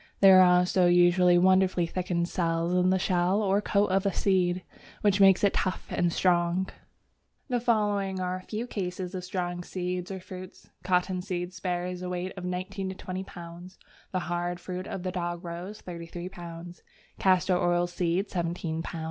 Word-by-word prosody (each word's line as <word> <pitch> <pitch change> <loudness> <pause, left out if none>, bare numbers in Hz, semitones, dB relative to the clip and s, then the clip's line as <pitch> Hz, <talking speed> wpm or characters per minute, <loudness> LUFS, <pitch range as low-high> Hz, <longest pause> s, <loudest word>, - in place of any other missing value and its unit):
There 190 -1 +8
are 180 -1 +6
also 180 0 +3
usually 175 0 +5
wonderfully 185 -1 +4
thickened 175 0 -1
cells 165 -1 0
in 180 0 +3
the 190 - +3
shell 185 +2 +1
or 200 +1 +2
coat 200 -1 +1
of 190 0 +2
a 200 - +1
seed, 180 -1 +1 0.4
which 205 -1 +3
makes 195 0 +6
it 200 - +4
tough 185 - -1
and 175 -1 +1
strong. 175 +1 +1 0.8
The 245 -1 +1
following 205 -5 +1
are 185 0 -2
a - - -9
few 215 +5 -4
cases 185 -4 -4
of 185 -1 -4
strong 175 -1 -3
seeds 180 0 -4
or 190 -1 -5
fruits: 185 0 -11
Cotton 180 0 +1
seed 180 -1 -4
bears 180 0 -2
a 180 - -4
weight 180 +1 -3
of 185 -2 -6
19 185 +1 -3
to 190 - -6
20 185 0 -5
lb.; 175 +2 -10 0.3
the 185 - 0
hard 175 0 -2
fruits 185 +1 -6
of 190 - -5
the 185 - -2
Dogrose, 175 +2 -5
33 170 0 -7
lb.; 175 -1 -9 0.4
Castor 185 -1 +3
oil 175 0 +2
seed, 175 +2 -1
17 170 -2 -2
lb. 170 0 -6
180 Hz, 175 wpm, -28 LUFS, 175-190 Hz, 0.8 s, There